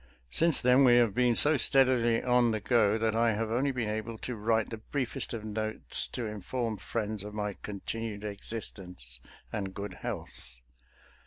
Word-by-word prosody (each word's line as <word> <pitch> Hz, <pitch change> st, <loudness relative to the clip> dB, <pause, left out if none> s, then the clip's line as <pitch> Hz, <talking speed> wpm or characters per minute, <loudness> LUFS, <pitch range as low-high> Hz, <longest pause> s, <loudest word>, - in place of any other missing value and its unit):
Since 165 Hz, -2 st, +2 dB
then 125 Hz, +2 st, +5 dB
we 120 Hz, -2 st, +6 dB
have 120 Hz, -4 st, +4 dB
been 125 Hz, +1 st, +2 dB
so 150 Hz, +4 st, +6 dB
steadily 125 Hz, -4 st, +3 dB
on 125 Hz, -1 st, +3 dB
the 110 Hz, -1 st, -1 dB
go 110 Hz, -1 st, +3 dB
that 110 Hz, 0 st, 0 dB
I 115 Hz, 0 st, +3 dB
have 110 Hz, +1 st, -2 dB
only 130 Hz, +5 st, +1 dB
been 125 Hz, -4 st, -2 dB
able 110 Hz, +1 st, -4 dB
to 125 Hz, +2 st, -5 dB
write 110 Hz, +1 st, 0 dB
the 115 Hz, -, -4 dB
briefest 125 Hz, +3 st, -3 dB
of 110 Hz, -2 st, -5 dB
notes 110 Hz, 0 st, +1 dB
to 120 Hz, -, -5 dB
inform 110 Hz, +2 st, -3 dB
friends 110 Hz, -2 st, -3 dB
of 105 Hz, 0 st, -8 dB
my 105 Hz, -1 st, -2 dB
continued 105 Hz, +1 st, -5 dB
existence 95 Hz, -, -7 dB, 0.3 s
and 95 Hz, -2 st, -4 dB
good 100 Hz, 0 st, -5 dB
health. -, -, -7 dB
110 Hz, 170 wpm, -30 LUFS, 105-120 Hz, 0.3 s, we